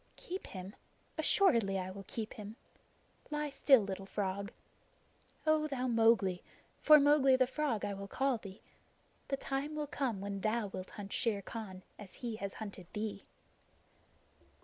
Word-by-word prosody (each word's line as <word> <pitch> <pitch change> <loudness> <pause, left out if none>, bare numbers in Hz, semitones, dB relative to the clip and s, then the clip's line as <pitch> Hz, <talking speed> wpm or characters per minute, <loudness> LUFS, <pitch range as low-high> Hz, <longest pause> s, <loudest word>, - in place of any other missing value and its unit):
Keep 370 +2 -6
him? 190 +1 -8 0.4
Assuredly 230 - +4
I 185 0 -3
will 195 +1 -9
keep 220 -1 -4
him. 210 0 -8 0.7
Lie 300 -1 -2
still, 275 -2 +6
little 195 -1 -5
frog. 200 +1 -2 0.9
O 310 -1 +3
thou 265 -3 -2
Mowgli 225 -6 +3 0.4
for 305 0 +9
Mowgli 280 -2 +5
the 260 0 +4
Frog 260 -4 -1
I 200 - -2
will 200 0 -6
call 265 +2 0
thee 195 -1 -11 0.6
the 275 - -1
time 275 +3 -3
will 300 -1 -1
come 265 -7 -2
when 200 0 -4
thou 220 +1 +1
wilt 185 -1 -6
hunt 200 -1 -6
Shere 215 -5 0
Khan 190 -5 -7 0.2
as 205 -3 -10
he 225 -2 -3
has 200 -3 -5
hunted 200 -5 -7
thee." 210 -2 -3
220 Hz, 150 wpm, -34 LUFS, 195-270 Hz, 0.9 s, for